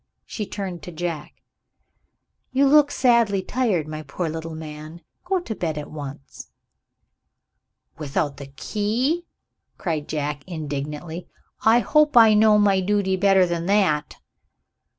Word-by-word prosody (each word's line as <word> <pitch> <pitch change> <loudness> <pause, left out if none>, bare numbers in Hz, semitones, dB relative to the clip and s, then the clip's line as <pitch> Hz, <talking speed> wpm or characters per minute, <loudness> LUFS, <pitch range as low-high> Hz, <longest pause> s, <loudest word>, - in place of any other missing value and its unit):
She 210 -3 -5
turned 185 -4 -5
to 175 - -9
Jack. 165 -2 -6 1.1
"You 275 +2 +3
look 290 +1 +5
sadly 235 -8 +2
tired, 205 - 0
my 155 0 -6
poor 155 +3 -4
little 160 0 -6
man. 155 +1 -9 0.2
Go 375 +1 +1
to 235 - -5
bed 160 -7 -3
at 150 -1 -6
once." 140 -2 -9 1.5
"Without 145 -1 -2
the 140 - -9
key?" 230 - -2 0.5
cried 160 -6 -3
Jack 145 -2 -3
indignantly. 155 +1 -5 0.4
"I 230 +2 +5
hope 300 -1 +3
I 225 -2 +8
know 210 0 +5
my 200 -2 +3
duty 195 0 +1
better 190 -1 +4
than 170 0 -3
that." 185 -8 +1
180 Hz, 130 wpm, -23 LUFS, 155-215 Hz, 1.5 s, I